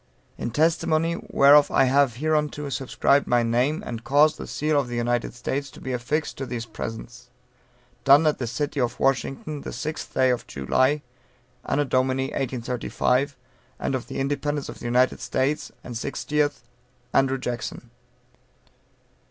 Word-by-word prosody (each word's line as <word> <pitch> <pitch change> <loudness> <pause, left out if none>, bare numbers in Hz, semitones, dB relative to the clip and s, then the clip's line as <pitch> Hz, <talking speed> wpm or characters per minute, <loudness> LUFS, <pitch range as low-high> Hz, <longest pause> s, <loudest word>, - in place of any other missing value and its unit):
In - - -4
testimony 160 +4 +2 0.2
whereof 145 +1 +6
I 135 - +4
have 135 -2 +3
hereunto 150 +1 -1
subscribed 140 +1 +1
my 120 -1 +3
name, 125 - +1
and 115 -1 -5
caused 150 +3 +4
the - - -6
seal 150 0 +1
of 135 - -2
the 120 - -5
United 120 +1 -1
States 140 +3 -3
to - - -14
be 130 - -4
affixed 130 +6 -2
to 135 - -4
these 120 -1 -4
presents. 120 +2 -8 0.7
Done 140 +3 +6
at 155 - +2
the 120 - -2
City 145 +3 -2
of 120 -1 -1
Washington 135 +2 -1
the - - -6
sixth 155 -1 -5
day 130 -1 +4
of 125 - -2
July, 130 - +1 0.6
AD. 135 - 0 0.2
1835, 130 +1 0 0.4
and - - -2
of 130 -2 -3
the - - -6
independence 145 +1 -2
of - - -9
the - - -9
United 125 +2 +2
States 145 +3 -1
and 120 - -7
sixtieth. 145 +3 -1 0.5
Andrew 135 0 +3
Jackson. 125 -2 -5
135 Hz, 150 wpm, -25 LUFS, 125-145 Hz, 0.7 s, whereof